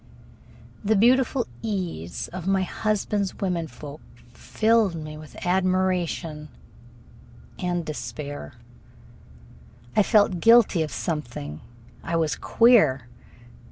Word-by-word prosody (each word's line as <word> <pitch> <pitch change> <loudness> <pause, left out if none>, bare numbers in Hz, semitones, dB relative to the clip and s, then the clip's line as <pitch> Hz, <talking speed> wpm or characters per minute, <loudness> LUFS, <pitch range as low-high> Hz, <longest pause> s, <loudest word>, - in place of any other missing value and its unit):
The 215 +2 +2
beautiful 250 +4 +3 0.2
ease 180 - -4
of 185 0 -7
my 195 -1 +2
husband's 205 0 -1
women 180 -4 -2
folk 150 -1 -10 0.3
filled 220 - +1
me 155 -1 -7
with 155 0 -12
admiration 180 -4 0 1.1
and 175 -2 -2
despair. 145 - -6 1.4
I - - +6
felt 205 -4 +3
guilty 230 -6 +5
of 155 - -1
something. 120 - -4 0.4
I 170 - -2
was 160 -2 +1
queer. 155 - +4
180 Hz, 95 wpm, -25 LUFS, 155-205 Hz, 1.4 s, I